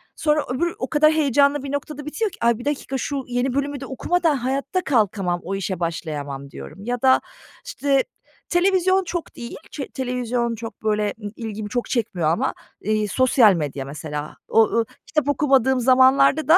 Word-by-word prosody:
Sonra 300 Hz, -1 st, +1 dB
öbür 335 Hz, +7 st, -1 dB
o 255 Hz, -, -3 dB
kadar 305 Hz, 0 st, +5 dB
heyecanlı 285 Hz, -1 st, +3 dB
bir 275 Hz, -, -5 dB
noktada 295 Hz, +1 st, -4 dB
bitiyor 390 Hz, +8 st, -2 dB
ki -, -, -14 dB
"Ay, 235 Hz, -1 st, +3 dB
bir 240 Hz, -, -9 dB
dakika, 285 Hz, -2 st, -2 dB
şu 275 Hz, +1 st, -3 dB
yeni 245 Hz, +1 st, -1 dB
bölümü 280 Hz, +1 st, -1 dB
de 270 Hz, -, -6 dB
okumadan 325 Hz, +4 st, +1 dB
hayatta 270 Hz, +7 st, -1 dB
kalkamam, 200 Hz, -8 st, +1 dB
o 195 Hz, +3 st, -3 dB
işe 190 Hz, -2 st, -3 dB
başlayamam." 145 Hz, -5 st, -4 dB
diyorum. -, -, -10 dB
Ya 245 Hz, 0 st, -2 dB
da, 260 Hz, -1 st, +5 dB, 0.4 s
işte, 280 Hz, -, +1 dB, 0.5 s
televizyon 375 Hz, +1 st, +3 dB
çok 345 Hz, -1 st, -5 dB
değil, 235 Hz, -, -7 dB, 0.2 s
çe 280 Hz, -, -5 dB
televizyon 245 Hz, -2 st, -2 dB
çok, 225 Hz, 0 st, -9 dB
böyle, 210 Hz, -1 st, +1 dB
ımm, 205 Hz, -, -4 dB
ilgimi 215 Hz, -2 st, -5 dB
çok 245 Hz, +2 st, -2 dB
çekmiyor 195 Hz, -10 st, 0 dB
ama, 165 Hz, -, 0 dB, 0.3 s
eee, 215 Hz, +1 st, 0 dB
sosyal 240 Hz, -1 st, +5 dB
medya 145 Hz, -5 st, -3 dB
mesela. 150 Hz, +1 st, -6 dB
O 225 Hz, -, +5 dB
o 230 Hz, +1 st, +1 dB, 0.2 s
kitap 305 Hz, -2 st, 0 dB
okumadığım 265 Hz, -3 st, +3 dB
zamanlarda 260 Hz, +4 st, +5 dB
da 325 Hz, +3 st, +8 dB
255 Hz, 175 wpm, -22 LUFS, 210-285 Hz, 0.5 s, da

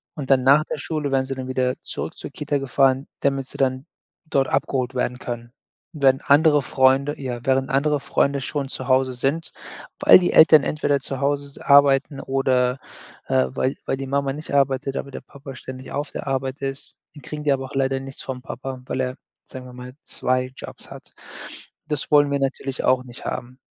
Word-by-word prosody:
Und 140 Hz, -3 st, -4 dB
dann 130 Hz, -1 st, +4 dB
nach 140 Hz, +3 st, +6 dB
der -, -, -4 dB
Schule 150 Hz, -1 st, -3 dB
werden 135 Hz, -1 st, +2 dB
sie 135 Hz, 0 st, -4 dB
dann 130 Hz, -1 st, -6 dB
wieder 130 Hz, -1 st, 0 dB
zurück -, -, -6 dB
zur -, -, -8 dB
Kita 145 Hz, -1 st, -2 dB
gefahren, 135 Hz, 0 st, +2 dB
damit 135 Hz, -1 st, 0 dB
sie -, -, -9 dB
dann 130 Hz, +1 st, 0 dB, 0.4 s
dort 135 Hz, -3 st, +1 dB
abgeholt 130 Hz, -1 st, -1 dB
werden 125 Hz, 0 st, -1 dB
können. 120 Hz, -1 st, -6 dB, 0.4 s
Während 135 Hz, -3 st, +2 dB
andere 150 Hz, 0 st, +5 dB
Freunde 135 Hz, +3 st, +2 dB
ja, 125 Hz, -3 st, -4 dB
während 135 Hz, 0 st, +1 dB
andere 145 Hz, +2 st, +1 dB
Freunde 140 Hz, 0 st, +1 dB
schon 140 Hz, 0 st, -3 dB
zu -, -, -6 dB
Hause 130 Hz, 0 st, +2 dB
sind, 140 Hz, +6 st, -2 dB, 0.5 s
weil -, -, +8 dB
die 175 Hz, -, 0 dB
Eltern 155 Hz, -2 st, +8 dB
entweder 145 Hz, -1 st, 0 dB
zu 135 Hz, 0 st, -5 dB
Hause 140 Hz, 0 st, 0 dB
s 140 Hz, -, -12 dB
arbeiten 140 Hz, 0 st, +4 dB
oder, 130 Hz, -1 st, +1 dB, 0.5 s
äh, 65 Hz, 0 st, +3 dB
weil 130 Hz, -, -1 dB
weil -, -, -1 dB
die 135 Hz, 0 st, -5 dB
Mama 140 Hz, 0 st, 0 dB
nicht 150 Hz, +1 st, -8 dB
arbeitet, 135 Hz, -1 st, +1 dB
aber 140 Hz, -, -5 dB
der -, -, -6 dB
Papa 140 Hz, -1 st, -11 dB
ständig 130 Hz, +1 st, -9 dB
auf 145 Hz, +2 st, -3 dB
der -, -, -6 dB
Arbeit 135 Hz, +1 st, -2 dB
ist. 135 Hz, 0 st, -5 dB, 0.2 s
Dann 145 Hz, -, -13 dB
kriegen 150 Hz, -1 st, -6 dB
die 145 Hz, -, +2 dB
aber 135 Hz, -1 st, -3 dB
auch 135 Hz, -, -10 dB
leider 135 Hz, 0 st, +1 dB
nichts 135 Hz, 0 st, -8 dB
vom 130 Hz, -1 st, -6 dB
Papa, 130 Hz, 0 st, -7 dB
weil 130 Hz, -, -2 dB
er, 130 Hz, 0 st, -2 dB, 0.3 s
sagen 130 Hz, -1 st, -10 dB
wir 125 Hz, -, -11 dB
mal, 125 Hz, +1 st, -9 dB
2 130 Hz, 0 st, -1 dB
Jobs -, -, -10 dB
hat. -, -, -12 dB, 0.7 s
Das 150 Hz, -3 st, -3 dB
wollen 145 Hz, -1 st, +5 dB
wir 140 Hz, -, +1 dB
natürlich 135 Hz, 0 st, -3 dB
auch 130 Hz, 0 st, +3 dB
nicht 125 Hz, -1 st, -12 dB
haben. 130 Hz, +2 st, -5 dB
135 Hz, 200 wpm, -22 LUFS, 130-140 Hz, 0.7 s, weil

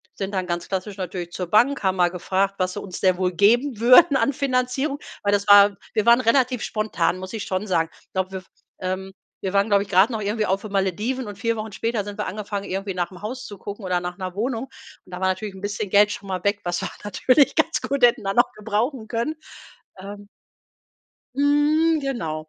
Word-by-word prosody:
sind 195 Hz, +1 st, -4 dB
dann 185 Hz, -1 st, -1 dB
ganz 175 Hz, -1 st, -3 dB
klassisch 195 Hz, +1 st, -4 dB
natürlich 180 Hz, -2 st, -5 dB
zur 180 Hz, 0 st, -4 dB
Bank, 250 Hz, +7 st, +3 dB
haben 190 Hz, 0 st, +2 dB
mal 175 Hz, -1 st, +4 dB
gefragt: 190 Hz, +2 st, -1 dB
„Was 185 Hz, 0 st, 0 dB
sie 205 Hz, -, -5 dB
uns 185 Hz, -3 st, -7 dB
denn 185 Hz, -1 st, +3 dB
wohl 185 Hz, -1 st, 0 dB
geben 235 Hz, +5 st, +3 dB
würden 255 Hz, +4 st, +7 dB
an 280 Hz, -, +1 dB
Finanzierung“, 265 Hz, +1 st, -1 dB, 0.2 s
weil 205 Hz, -, +2 dB
das 200 Hz, 0 st, 0 dB
war 205 Hz, -1 st, +7 dB, 0.2 s
wir 215 Hz, 0 st, 0 dB
waren 235 Hz, +2 st, +6 dB
relativ 250 Hz, 0 st, +2 dB
spontan, 195 Hz, -5 st, -1 dB
muss 185 Hz, +3 st, -8 dB
ich 220 Hz, -, -4 dB
schon 185 Hz, +2 st, -2 dB
sagen. 165 Hz, -3 st, +1 dB, 0.2 s
Glaube, 190 Hz, 0 st, -2 dB
wir, 185 Hz, -1 st, -5 dB, 0.4 s
ähm 190 Hz, +1 st, -4 dB, 0.3 s
wir 190 Hz, 0 st, -2 dB
waren, 200 Hz, +2 st, +2 dB
glaube 200 Hz, -1 st, +4 dB
ich, 205 Hz, -, -15 dB
grade 195 Hz, +5 st, +4 dB
noch 215 Hz, -, -3 dB
irgendwie 210 Hz, +1 st, -1 dB
auf 195 Hz, +1 st, 0 dB
den 215 Hz, -, -8 dB
Malediven 210 Hz, +7 st, -1 dB
und 205 Hz, -, -7 dB
4 230 Hz, +2 st, -1 dB
Wochen 215 Hz, 0 st, -5 dB
später 225 Hz, -1 st, -2 dB
sind 205 Hz, 0 st, -8 dB
wir -, -, -2 dB
angefangen, 205 Hz, 0 st, -5 dB
irgendwie 195 Hz, +1 st, -3 dB
nach 175 Hz, 0 st, -2 dB
'nem 185 Hz, +2 st, -13 dB
Haus 250 Hz, +5 st, -5 dB
zu 205 Hz, -, -10 dB
gucken 205 Hz, +2 st, -8 dB
oder 180 Hz, -1 st, 0 dB
nach 175 Hz, 0 st, -5 dB
'ner 185 Hz, -1 st, -6 dB
Wohnung. 235 Hz, +3 st, -2 dB, 0.4 s
Und 185 Hz, -, -18 dB
da 180 Hz, -, -5 dB
war -, -, +1 dB
natürlich 190 Hz, +1 st, -3 dB
'n 190 Hz, -, -11 dB
bisschen 205 Hz, 0 st, -3 dB
Geld 205 Hz, +1 st, +5 dB
schon 200 Hz, -, -7 dB
mal 185 Hz, -1 st, -3 dB
weg, 200 Hz, 0 st, +1 dB
was 175 Hz, 0 st, -2 dB
wir -, -, -2 dB
natürlich 255 Hz, +7 st, +3 dB
ganz -, -, +1 dB
gut 280 Hz, -2 st, -2 dB
hätten 240 Hz, -2 st, +5 dB
da 195 Hz, 0 st, -1 dB
noch 245 Hz, +1 st, +4 dB
gebrauchen 220 Hz, +3 st, -2 dB
können. 235 Hz, +7 st, -2 dB, 0.7 s
Ähm 200 Hz, +1 st, -9 dB, 1.1 s
Mhm, 300 Hz, +3 st, +3 dB
genau. 160 Hz, -, -4 dB
205 Hz, 220 wpm, -23 LUFS, 185-235 Hz, 1.1 s, würden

